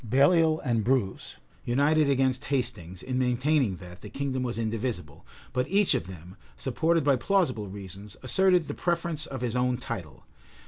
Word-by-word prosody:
Baliol 155 Hz, -, +4 dB
and 115 Hz, -4 st, +1 dB
Bruce 120 Hz, -6 st, -1 dB, 0.3 s
united 145 Hz, +4 st, +3 dB
against 130 Hz, -1 st, +1 dB
Hastings, 110 Hz, -, -2 dB
in 130 Hz, 0 st, -2 dB
maintaining 125 Hz, -2 st, +2 dB
that, 90 Hz, 0 st, -12 dB
the -, -, -9 dB
kingdom 135 Hz, -2 st, -2 dB
was 120 Hz, -2 st, -2 dB
indivisible; 110 Hz, -, -4 dB, 0.3 s
but 125 Hz, 0 st, 0 dB
each 200 Hz, 0 st, +4 dB
of 85 Hz, -, -1 dB
them, 90 Hz, 0 st, -11 dB, 0.2 s
supported 165 Hz, -, +1 dB
by 140 Hz, -2 st, +3 dB
plausible 130 Hz, -, 0 dB
reasons, 100 Hz, +1 st, -9 dB
asserted 180 Hz, +6 st, +4 dB
the -, -, -5 dB
preference 170 Hz, -3 st, -1 dB
of 130 Hz, -2 st, -6 dB
his 125 Hz, -1 st, -2 dB
own 125 Hz, 0 st, +1 dB
title. 115 Hz, -, -7 dB
125 Hz, 155 wpm, -27 LUFS, 105-145 Hz, 0.3 s, Baliol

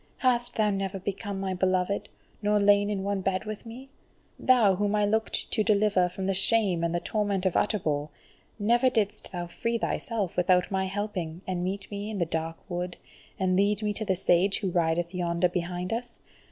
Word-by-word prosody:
hast 245 Hz, -2 st, +1 dB
thou 215 Hz, -2 st, +2 dB
never 195 Hz, 0 st, -2 dB
become 200 Hz, +1 st, -4 dB
my 190 Hz, -1 st, -2 dB
beloved, 185 Hz, +1 st, 0 dB, 0.3 s
nor 210 Hz, 0 st, +2 dB
lain 205 Hz, 0 st, +4 dB
in 200 Hz, -2 st, -2 dB
one 200 Hz, -1 st, -1 dB
bed 185 Hz, +1 st, -1 dB
with 215 Hz, +1 st, -6 dB
me? 250 Hz, +4 st, -9 dB, 0.5 s
Thou 235 Hz, -6 st, +5 dB
whom 205 Hz, +2 st, 0 dB
I 210 Hz, 0 st, +3 dB
looked 220 Hz, +2 st, 0 dB
to 215 Hz, -, +2 dB
deliver 205 Hz, -4 st, +3 dB
from 190 Hz, +2 st, -5 dB
the 195 Hz, -, +1 dB
shame 195 Hz, -3 st, +3 dB
and 170 Hz, 0 st, 0 dB
the -, -, +1 dB
torment 200 Hz, -1 st, -1 dB
of 185 Hz, -, +2 dB
Utterbol, 155 Hz, -8 st, 0 dB, 0.5 s
never 235 Hz, +4 st, +3 dB
didst 215 Hz, -3 st, -1 dB
thou 175 Hz, -2 st, -4 dB
free 230 Hz, +7 st, -2 dB
thyself 220 Hz, -5 st, -2 dB
without 180 Hz, +1 st, +2 dB
my 190 Hz, 0 st, 0 dB
helping, 190 Hz, -4 st, -4 dB
and 180 Hz, -1 st, -2 dB
meet 195 Hz, +2 st, -4 dB
me 205 Hz, +1 st, -4 dB
in 215 Hz, -, -4 dB
the 175 Hz, -, +1 dB
dark 165 Hz, 0 st, -3 dB
wood, 180 Hz, -1 st, -4 dB, 0.4 s
and 185 Hz, -1 st, +1 dB
lead 205 Hz, +2 st, +2 dB
me 210 Hz, 0 st, 0 dB
to 215 Hz, -, -3 dB
the 195 Hz, -3 st, +1 dB
Sage 185 Hz, +2 st, +3 dB
who 190 Hz, -3 st, -1 dB
rideth 170 Hz, +1 st, 0 dB
yonder 175 Hz, 0 st, +1 dB
behind 180 Hz, +2 st, -3 dB
us! 240 Hz, +1 st, -5 dB
195 Hz, 195 wpm, -27 LUFS, 180-210 Hz, 0.5 s, Thou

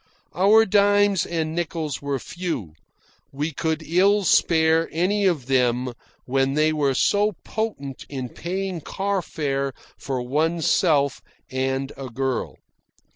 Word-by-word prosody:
Our 210 Hz, +5 st, +5 dB
dimes 205 Hz, -1 st, +3 dB
and 160 Hz, -2 st, -2 dB
nickels 160 Hz, -3 st, -3 dB
were 140 Hz, -1 st, -2 dB
few. 145 Hz, -, -5 dB, 0.6 s
We 150 Hz, +4 st, -3 dB
could 160 Hz, +2 st, -2 dB
ill 195 Hz, +5 st, +3 dB
spare 160 Hz, -2 st, +3 dB
any 195 Hz, +5 st, +1 dB
of 160 Hz, -9 st, 0 dB
them 125 Hz, -1 st, +1 dB, 0.3 s
when 135 Hz, +1 st, +1 dB
they 155 Hz, +1 st, +3 dB
were 140 Hz, -3 st, +1 dB
so 205 Hz, +8 st, +2 dB
potent 170 Hz, -, -4 dB
in 130 Hz, -3 st, -5 dB
paying 185 Hz, +2 st, -4 dB
car 195 Hz, +4 st, -2 dB
fare 140 Hz, -4 st, -2 dB, 0.3 s
for 135 Hz, -2 st, -3 dB
oneself 155 Hz, +1 st, +1 dB, 0.3 s
and 130 Hz, +1 st, -1 dB
a 135 Hz, -1 st, -7 dB
girl. 130 Hz, +1 st, -2 dB
155 Hz, 125 wpm, -23 LUFS, 135-185 Hz, 0.6 s, Our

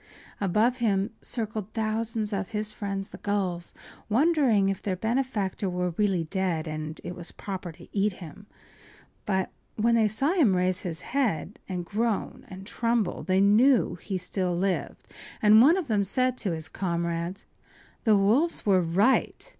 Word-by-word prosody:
Above 215 Hz, +6 st, +2 dB
him 205 Hz, -3 st, +1 dB
circled 220 Hz, -3 st, -3 dB
thousands 220 Hz, -1 st, -1 dB
of 195 Hz, -1 st, -2 dB
his 215 Hz, 0 st, -2 dB
friends 200 Hz, -2 st, -4 dB
the -, -, -11 dB
gulls, 185 Hz, -4 st, -2 dB, 0.4 s
wondering 255 Hz, -5 st, +3 dB
if 195 Hz, 0 st, -1 dB
their 190 Hz, -3 st, -1 dB
benefactor 220 Hz, -3 st, -1 dB
were 180 Hz, 0 st, -1 dB
really 190 Hz, -1 st, +1 dB
dead 170 Hz, -1 st, -2 dB
and 155 Hz, 0 st, -5 dB
it 175 Hz, -, -5 dB
was 175 Hz, -1 st, -6 dB
proper 190 Hz, -3 st, -6 dB
to 160 Hz, -, -15 dB
eat 200 Hz, 0 st, +2 dB
him. 180 Hz, +3 st, -11 dB, 0.8 s
But 190 Hz, -2 st, 0 dB, 0.2 s
when 230 Hz, +2 st, +2 dB
they 225 Hz, -2 st, +4 dB
saw 270 Hz, -, +1 dB
him 275 Hz, -, +4 dB
raise 185 Hz, 0 st, +1 dB
his 165 Hz, -3 st, -4 dB
head 230 Hz, -, -1 dB
and 180 Hz, -2 st, -3 dB
groan 220 Hz, +2 st, -2 dB
and 190 Hz, +1 st, -10 dB
tremble 230 Hz, -2 st, -1 dB
they 190 Hz, 0 st, +2 dB
knew 230 Hz, +6 st, +4 dB
he 190 Hz, +2 st, -4 dB
still 180 Hz, -1 st, -2 dB
lived, 190 Hz, 0 st, -2 dB, 0.3 s
and 215 Hz, +1 st, +7 dB
one 315 Hz, +9 st, +6 dB
of 365 Hz, -, -3 dB
them 210 Hz, -4 st, +2 dB
said 255 Hz, +5 st, +1 dB
to 195 Hz, -, -2 dB
his 160 Hz, -1 st, -4 dB
comrades: 170 Hz, +1 st, -3 dB, 0.6 s
“The 215 Hz, -4 st, +5 dB
wolves 240 Hz, +13 st, +2 dB
were 190 Hz, -3 st, +4 dB
right. 195 Hz, +10 st, +1 dB
200 Hz, 160 wpm, -27 LUFS, 185-225 Hz, 0.8 s, and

